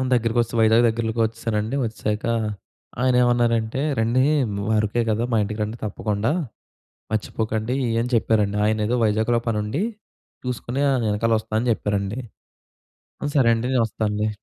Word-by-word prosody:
దగ్గరకి 115 0 0
వచ్చేశాం, 115 0 -2
వైజాగ్ 110 +2 +5
దగ్గర‌లోకి 115 0 -1
వచ్చేసానండి. 110 +1 -2
వచ్చేసాక 105 -1 -3 0.8
ఆయనేమన్నారంటే, 120 -1 +2 0.2
"రండీ 120 +3 +2 0.3
ము 100 +1 -3
అరకే 110 +3 +1
కదా! 110 +2 0
మా - - +4
ఇంటికి 105 +2 -5
రండి 110 +3 -5
తప్పకుండా. 105 +5 -1 0.8
మర్చిపోకండి" 110 +2 -1 0.3
అని 125 - -3
చెప్పారండి. 105 -2 +1
ఆయనేదో 110 +2 +1
వైజాగ్‌లో 110 +2 +2
పని 110 -2 0
ఉండి 125 - -2 0.6
చూసుకొని 125 +2 -3
ఆయన 130 -3 +1
వెనకాల 115 +2 +1
వస్తానని 110 +3 -1
చెప్పారండి. 105 +4 -2 1.2
"సరే 120 -3 +5
అండి. 115 +2 -2
నేను 120 - +4
వస్తానులే". 105 0 -1
110 Hz, 130 wpm, -23 LUFS, 105-120 Hz, 1.2 s, వైజాగ్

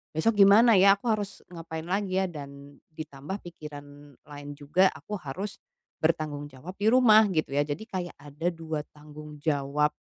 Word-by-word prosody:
"Besok 205 +6 +2
gimana 215 +4 +7
ya? 195 0 +6
Aku 200 - -19
harus 205 -2 -5
ngapain 160 -1 -7
lagi 190 +1 -1
ya?" 190 - +2
Dan 140 -4 -10 0.2
ditambah 155 +4 -6
pikiran 145 -4 -11
lain 145 0 -10
juga 155 +6 +3
aku 155 +7 -10
harus 190 +9 -6 0.4
bertanggung 155 -2 -1
jawab 150 +8 -11
di 205 - -3
rumah, 220 -4 +7
gitu 150 -3 -1
ya. 145 - +3
Jadi 155 +10 -6
kayak 180 -2 -4
ada 150 +5 -3
2 160 -2 -5
tanggung 150 0 -12
jawab, 145 0 +1
155 Hz, 160 wpm, -27 LUFS, 145-190 Hz, 0.4 s, gimana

